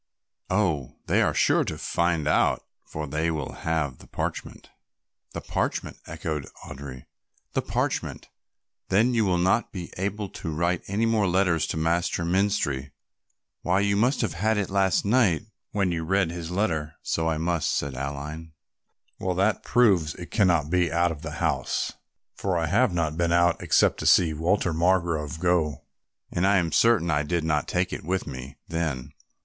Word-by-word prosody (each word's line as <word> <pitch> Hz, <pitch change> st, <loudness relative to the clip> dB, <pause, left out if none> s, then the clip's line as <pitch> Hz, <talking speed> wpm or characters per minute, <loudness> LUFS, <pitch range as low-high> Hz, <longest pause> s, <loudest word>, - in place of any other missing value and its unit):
"Oh, 85 Hz, -10 st, 0 dB
they -, -, +2 dB
are -, -, +1 dB
sure -, -, +3 dB
to -, -, -4 dB
find 85 Hz, -3 st, 0 dB
out, -, -, +2 dB, 0.2 s
for 75 Hz, 0 st, -5 dB
they 75 Hz, +3 st, -1 dB
will 75 Hz, -5 st, -3 dB, 0.2 s
have 75 Hz, -6 st, -1 dB
the -, -, -15 dB
parchment." -, -, -5 dB, 0.6 s
"The -, -, -4 dB
parchment," -, -, -2 dB
echoed 80 Hz, -3 st, -4 dB, 0.2 s
Audry, 65 Hz, -2 st, -9 dB, 0.5 s
"the -, -, +1 dB
parchment; -, -, -2 dB, 0.6 s
then 110 Hz, +6 st, +3 dB
you 115 Hz, -2 st, +2 dB
will 90 Hz, -2 st, +2 dB
not 95 Hz, +6 st, +2 dB
be 90 Hz, -4 st, -7 dB
able 100 Hz, +2 st, -2 dB
to 85 Hz, -, -6 dB
write 85 Hz, +3 st, 0 dB
any 105 Hz, +4 st, 0 dB
more 110 Hz, -3 st, +2 dB
letters 90 Hz, -3 st, +2 dB
to -, -, -3 dB
Master 85 Hz, +1 st, 0 dB
Menstrie. 85 Hz, -7 st, 0 dB, 0.7 s
Why, 90 Hz, +2 st, +2 dB
you 100 Hz, 0 st, +2 dB
must 125 Hz, +7 st, +2 dB
have 110 Hz, -9 st, -1 dB
had 105 Hz, +6 st, +1 dB
it 100 Hz, -2 st, -1 dB
last 95 Hz, -2 st, +2 dB
night 105 Hz, -6 st, +3 dB, 0.2 s
when 100 Hz, -3 st, 0 dB
you 80 Hz, -1 st, -2 dB
read 95 Hz, 0 st, +1 dB
his 85 Hz, -1 st, -6 dB
letter." 85 Hz, -6 st, -1 dB
"So 80 Hz, 0 st, 0 dB
I 80 Hz, -, 0 dB
must," 85 Hz, 0 st, 0 dB
said 70 Hz, -1 st, -1 dB
Aline. 70 Hz, +4 st, -6 dB, 0.7 s
"Well, 90 Hz, -1 st, -1 dB
that 100 Hz, +4 st, +2 dB
proves 95 Hz, -11 st, +3 dB
it 90 Hz, -, -9 dB
cannot 85 Hz, -, +2 dB
be 90 Hz, -3 st, +2 dB
out 85 Hz, +1 st, +2 dB
of 75 Hz, -3 st, -7 dB
the 80 Hz, -2 st, -6 dB
house, 80 Hz, -, -1 dB, 0.4 s
for 95 Hz, -3 st, -1 dB
I 80 Hz, -, +1 dB
have 110 Hz, +9 st, +3 dB
not 80 Hz, -3 st, -1 dB
been 85 Hz, 0 st, +1 dB
out 85 Hz, 0 st, +3 dB
except -, -, +3 dB
to -, -, -1 dB
see 80 Hz, -3 st, +5 dB
Walter 85 Hz, +3 st, +1 dB
Margrove 85 Hz, -3 st, +1 dB
go, 85 Hz, -5 st, +1 dB, 0.5 s
and 90 Hz, +3 st, +1 dB
I 100 Hz, 0 st, +4 dB
am 85 Hz, -3 st, 0 dB
certain 110 Hz, -8 st, +3 dB
I 75 Hz, -, +2 dB
did 85 Hz, +2 st, -1 dB
not 75 Hz, -2 st, 0 dB
take -, -, 0 dB
it -, -, -5 dB
with 95 Hz, +4 st, -1 dB
me 65 Hz, -1 st, -8 dB
then. 75 Hz, -5 st, -3 dB
85 Hz, 175 wpm, -26 LUFS, 80-95 Hz, 0.7 s, see